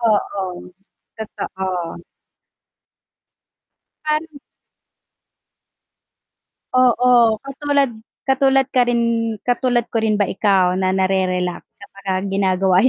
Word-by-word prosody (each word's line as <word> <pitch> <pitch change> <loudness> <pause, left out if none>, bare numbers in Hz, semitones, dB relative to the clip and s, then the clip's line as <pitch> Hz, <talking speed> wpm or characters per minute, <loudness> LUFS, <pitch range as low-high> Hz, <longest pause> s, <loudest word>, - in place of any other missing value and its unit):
Oo, 195 -5 -1 0.5
totoo. 185 -5 -5 2.0
Fan 305 +1 0
m 285 - -12 2.4
Oo, 245 -2 +4
katulad 280 0 0 0.3
katulad 270 0 +3
ka 250 -1 +3
rin, 240 -1 +2 0.4
katulad 245 -1 +1
ko 225 - +1
rin 220 -1 +1
ba 205 - +2
ikaw 190 -2 +2
na 185 - +1
nare-relax 185 -2 0 0.2
kapagka 195 -1 -5
ginagawa 190 -1 +2
yan, 250 - +4
210 Hz, 90 wpm, -19 LUFS, 190-250 Hz, 2.4 s, Oo